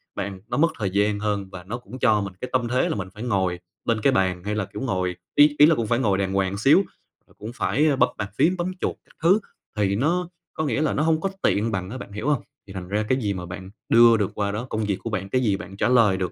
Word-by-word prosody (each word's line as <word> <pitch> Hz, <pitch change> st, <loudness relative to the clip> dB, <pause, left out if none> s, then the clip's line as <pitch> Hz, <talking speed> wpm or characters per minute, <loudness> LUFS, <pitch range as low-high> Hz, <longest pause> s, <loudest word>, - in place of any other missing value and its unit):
bạn 100 Hz, -1 st, -5 dB
nó -, -, -2 dB
mất 165 Hz, +3 st, +3 dB
thời 100 Hz, -3 st, 0 dB
gian 100 Hz, +2 st, +1 dB
hơn 105 Hz, -2 st, -2 dB
và 95 Hz, -2 st, -8 dB
nó 105 Hz, +6 st, -5 dB
cũng 125 Hz, +1 st, -11 dB
cho 110 Hz, -5 st, +3 dB
mình 100 Hz, -2 st, -5 dB
cái 125 Hz, -, -4 dB
tâm 125 Hz, -2 st, +1 dB
thế 125 Hz, +2 st, +1 dB
là -, -, -1 dB
mình 100 Hz, -2 st, -4 dB
phải 105 Hz, -, -8 dB
ngồi 95 Hz, -6 st, 0 dB, 0.3 s
bên 115 Hz, -2 st, 0 dB
cái 135 Hz, +4 st, +3 dB
bàn 90 Hz, -3 st, +1 dB
hay 105 Hz, +1 st, -2 dB
là, 105 Hz, -2 st, -1 dB
kiểu, 105 Hz, -, -8 dB
ngồi 90 Hz, -8 st, -1 dB, 0.2 s
ý 145 Hz, 0 st, +6 dB
ý 145 Hz, -, +10 dB
là 165 Hz, +1 st, +5 dB
cũng 115 Hz, -5 st, -2 dB
phải 120 Hz, +2 st, +1 dB
ngồi 100 Hz, -7 st, +2 dB
đàng 95 Hz, -1 st, -1 dB
hoàng 95 Hz, 0 st, 0 dB
xíu, 135 Hz, +10 st, +5 dB, 0.5 s
rồi -, -, -24 dB
cũng 110 Hz, +3 st, -7 dB
phải, 110 Hz, +8 st, +1 dB
ơ, 145 Hz, -, +3 dB
bấm -, -, +3 dB
bàn 105 Hz, -, -3 dB
phím, 180 Hz, +3 st, +3 dB
bấm 175 Hz, +1 st, -2 dB
chuột -, -, -1 dB
các -, -, -24 dB
thứ 185 Hz, +6 st, +5 dB, 0.4 s
thì 100 Hz, -1 st, +1 dB
nó 170 Hz, -, 0 dB, 0.2 s
có 155 Hz, -, -2 dB
nghĩa 135 Hz, 0 st, 0 dB
là 155 Hz, -, +1 dB
nó 150 Hz, -, 0 dB
hông 160 Hz, 0 st, +2 dB
có 195 Hz, -, 0 dB
tiện 110 Hz, +3 st, +1 dB
bằng 95 Hz, -2 st, -3 dB
á, 130 Hz, -, -6 dB
bạn 115 Hz, -, -9 dB
hiểu 105 Hz, +8 st, -3 dB
hông? 150 Hz, -, +1 dB, 0.3 s
Thì 95 Hz, -, -10 dB
thành 95 Hz, -2 st, -6 dB
ra 105 Hz, +3 st, 0 dB
cái 130 Hz, -, +3 dB
gì 100 Hz, -3 st, 0 dB
mà 90 Hz, -2 st, -6 dB
bạn 95 Hz, +1 st, -8 dB, 0.2 s
đưa 115 Hz, 0 st, +7 dB
được 105 Hz, -3 st, -1 dB
qua 100 Hz, -1 st, -1 dB
đó, 110 Hz, +4 st, -4 dB
công 110 Hz, 0 st, -2 dB
việc 100 Hz, -1 st, 0 dB
của -, -, -3 dB
bạn, 100 Hz, -3 st, -3 dB
cái 130 Hz, -, +1 dB
gì 105 Hz, -5 st, +1 dB
bạn 100 Hz, -1 st, -10 dB
trả -, -, +1 dB
lời 115 Hz, -6 st, +4 dB
được, 90 Hz, -1 st, -2 dB
105 Hz, 295 wpm, -24 LUFS, 95-130 Hz, 0.5 s, ý